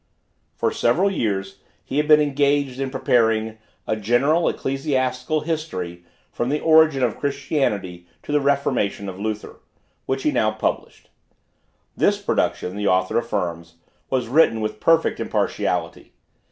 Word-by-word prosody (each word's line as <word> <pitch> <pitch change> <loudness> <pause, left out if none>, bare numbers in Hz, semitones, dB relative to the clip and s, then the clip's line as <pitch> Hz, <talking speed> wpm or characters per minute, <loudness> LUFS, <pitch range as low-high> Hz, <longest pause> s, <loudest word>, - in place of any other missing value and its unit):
For - - 0
several 180 +12 +2
years 95 - -2 0.3
he 135 - -4
had 150 0 +1
been 150 -1 +7
engaged 140 -2 +1
in 135 -1 -2
preparing 115 -4 +1 0.3
"A - - 0
General 120 +10 +2
Ecclesiastical 135 +1 -1
History 95 - -4 0.3
from 120 - -2
the 150 +2 0
origin 155 -4 +4
of 120 -4 -1
Christianity 105 - -2 0.2
to - - -6
the 150 0 +2
Reformation 135 -8 0
of 95 0 -7
Luther," 105 0 -5 0.5
which 135 0 -2
he 150 - +2
now 115 -5 +2
published. 110 0 -4 0.8
This - - +2
production, 90 - -1
the 105 0 -2
author 95 +3 +2
affirms, 85 -7 -4 0.3
was 130 -3 -1
written 130 -3 +3
with 110 0 -3
perfect 165 +4 +2
impartiality. - - -2
125 Hz, 135 wpm, -22 LUFS, 105-145 Hz, 0.8 s, been